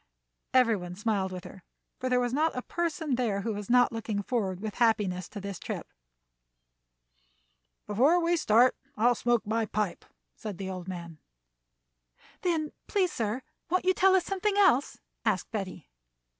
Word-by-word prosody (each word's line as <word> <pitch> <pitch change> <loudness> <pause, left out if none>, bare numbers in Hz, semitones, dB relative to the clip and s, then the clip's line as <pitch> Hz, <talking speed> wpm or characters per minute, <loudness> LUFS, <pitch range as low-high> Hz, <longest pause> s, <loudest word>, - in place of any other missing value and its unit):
Every 245 -3 +5
one 180 -2 -6
smiled 200 -2 0
with 180 -1 -6
her, 190 - -11 0.4
for 255 - -2
there 250 0 +3
was 245 0 0
not 310 0 +1
a 250 - -2
person 325 -4 -2
there 215 -6 0
who 220 +2 -2
was 205 -1 -6
not 245 0 +5
looking 220 -3 -3
forward 195 -6 -1
with 215 0 -6
happiness 200 -6 +2
to 205 - -7
this 200 -1 -6
trip. - - -6 1.9
"Before 265 - +4
we 340 0 +2
start 245 -5 +4 0.2
on 220 - +1
I'll 245 - +6
smoke 240 0 +1
my 220 +1 0
pipe," 210 -4 -2 0.3
said 210 -5 -6
the 190 0 -4
old 185 -1 -6
man. 170 -4 -7 1.2
"Then, 320 -4 0 0.2
please, 380 -4 +1
sir, 230 +2 -2 0.3
won't 365 +2 +1
you 370 - +5
tell 380 +1 +5
us 370 - +2
something 395 +1 0
else?" 360 -10 +4 0.3
asked - - 0
Betty. 190 -6 -5
230 Hz, 165 wpm, -29 LUFS, 200-295 Hz, 1.9 s, I'll